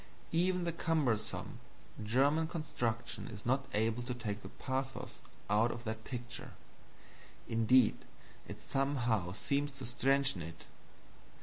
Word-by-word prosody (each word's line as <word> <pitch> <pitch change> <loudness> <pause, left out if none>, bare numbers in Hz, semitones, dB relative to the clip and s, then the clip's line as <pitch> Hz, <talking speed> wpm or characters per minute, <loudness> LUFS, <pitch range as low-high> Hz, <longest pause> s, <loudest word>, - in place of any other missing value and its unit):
Even 180 +2 +2
the 170 - 0
cumbersome 150 -10 0 0.4
German 140 +8 +3
construction 120 -8 -2
is 105 -2 -8
not 135 +3 +2
able 110 +2 +2
to 125 0 -3
take 105 -4 -3
the 95 - -8
pathos 130 +3 -3 0.4
out 110 +4 +4
of 120 - -6
that 110 -1 -4
picture 120 -2 -6 0.9
indeed, 115 +1 +5 0.5
it - - -7
somehow 120 -9 +1
seems 140 +8 0
to 135 -1 -7
strengthen 135 -3 +3
it. 80 +1 -8
120 Hz, 120 wpm, -35 LUFS, 110-140 Hz, 0.9 s, indeed